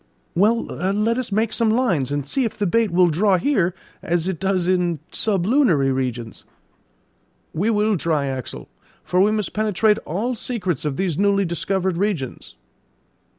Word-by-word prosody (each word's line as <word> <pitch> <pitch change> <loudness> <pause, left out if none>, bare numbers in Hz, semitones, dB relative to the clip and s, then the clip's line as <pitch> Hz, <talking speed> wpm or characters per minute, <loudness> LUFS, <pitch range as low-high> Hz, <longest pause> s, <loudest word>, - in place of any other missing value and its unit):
"Well, 215 +6 +3
let 210 +6 -1
us 255 - -4
make 220 +2 0
some 230 -2 +1
lines, 190 - +1
and 145 -1 -2
see 265 - 0
if 225 - -3
the 205 - 0
bait 225 +4 +2
will 180 +1 +4
draw 190 +4 +3
here 185 -5 +1 0.3
as 175 -2 -1
it 190 -4 -2
does 190 -2 0
in 175 -3 +1
sublunary 195 - +2
regions." 125 -3 -3 1.1
"We 190 +8 0
will 210 -1 +2
try, 155 -3 0
Axel, 130 -2 -5 0.4
for 180 +1 +1
we 200 - +4
must 215 -3 -2
penetrate 215 0 +2
all 215 +10 -3
secrets 190 - -3
of 145 -3 -2
these 185 -4 -1
newly 200 -1 +2
discovered 185 +1 -1
regions." 185 - -3
190 Hz, 155 wpm, -21 LUFS, 165-215 Hz, 1.1 s, will